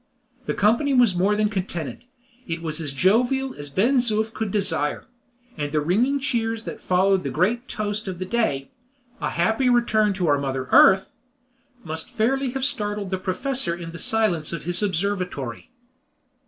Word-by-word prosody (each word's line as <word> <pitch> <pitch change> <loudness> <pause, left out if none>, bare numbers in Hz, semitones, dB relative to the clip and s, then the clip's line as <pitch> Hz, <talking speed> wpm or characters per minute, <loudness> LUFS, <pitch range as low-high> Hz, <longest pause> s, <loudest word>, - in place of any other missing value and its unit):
The - - -1
company 235 +7 +2
was 240 -6 +5
more 195 +4 +2
than 210 0 +2
contented 180 - -4 0.4
it 165 0 -4
was 160 0 -3
as 150 -3 -2
jovial 245 - +2
as 145 0 -8
Ben 230 - +2
Zoof 220 -2 +1
could 220 -2 -3
desire; 170 -7 -1 0.5
and 145 -1 -3
the 155 - +1
ringing 220 - +2
cheers 225 -4 -1
that - - -7
followed 190 +1 +2
the - - -3
great 230 - 0
toast 210 0 -3
of 185 -2 -4
the 185 - -4
day 185 -11 -1 0.5
"A - - 0
happy 220 +9 +1
return 220 -4 +3
to 190 -2 -2
our 145 -3 +3
Mother 135 -2 -3
Earth," 190 0 +6 0.7
must 160 0 -4
fairly 265 +4 0
have 270 -1 -1
startled 205 -7 -2
the 190 - -1
professor 190 0 -1
in 170 -1 -8
the 170 - -9
silence 190 -7 +1
of 170 -2 -5
his 175 +3 -1
observatory. 180 - -2
195 Hz, 170 wpm, -23 LUFS, 170-225 Hz, 0.7 s, Earth